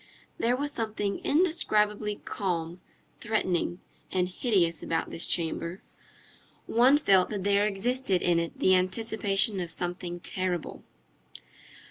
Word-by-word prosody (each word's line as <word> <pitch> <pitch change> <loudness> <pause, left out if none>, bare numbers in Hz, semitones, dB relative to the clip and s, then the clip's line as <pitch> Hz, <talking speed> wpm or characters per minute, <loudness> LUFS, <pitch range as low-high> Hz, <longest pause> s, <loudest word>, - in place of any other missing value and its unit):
There 245 +2 +1
was 290 +2 -2
something 215 -5 -3
indescribably 210 - +1
calm, 175 -3 -3 0.4
threatening, 185 -5 -1 0.3
and 180 -1 +1
hideous 180 -5 0
about 165 - -2
this 165 - +2
chamber. 170 +2 -2 0.8
One 255 +5 +4
felt 195 -10 +3
that 205 -3 -4
there 200 +1 +3
existed 210 -1 0
in 175 -1 +3
it 170 0 -4
the 185 - +4
anticipation 195 +1 +1
of 175 -2 -4
something 175 +1 -3
terrible. 180 -1 -4
195 Hz, 115 wpm, -28 LUFS, 175-220 Hz, 0.8 s, One